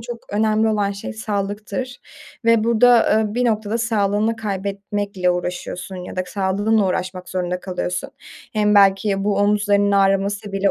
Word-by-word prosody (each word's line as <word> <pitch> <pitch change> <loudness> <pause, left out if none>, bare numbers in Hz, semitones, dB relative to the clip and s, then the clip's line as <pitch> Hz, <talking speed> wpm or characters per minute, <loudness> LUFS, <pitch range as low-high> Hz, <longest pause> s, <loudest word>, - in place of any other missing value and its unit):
çok 235 0 -7
önemli 220 +1 +2
olan 205 -2 0
şey 200 - -7
sağlıktır. 210 +3 -4 0.5
Ve 230 -1 +4
burada, 235 0 +4
ııı, 215 -1 0
bir 250 +1 +1
noktada 220 -1 0
sağlığını 220 -1 0
kaybetmekle 200 -2 -2
uğraşıyorsun 180 +1 -4
ya 180 0 -8
da 185 - 0
sağlığınla 200 +2 +1
uğraşmak 185 0 -3
zorunda 180 0 -2
kalıyorsun. 180 -1 -4 0.4
Hem 210 -1 +2
belki 195 0 +3
bu 205 -1 +1
omuzlarının 205 0 +2
ağrıması 195 +1 +1
bile 195 0 +1
205 Hz, 140 wpm, -20 LUFS, 195-220 Hz, 0.5 s, Ve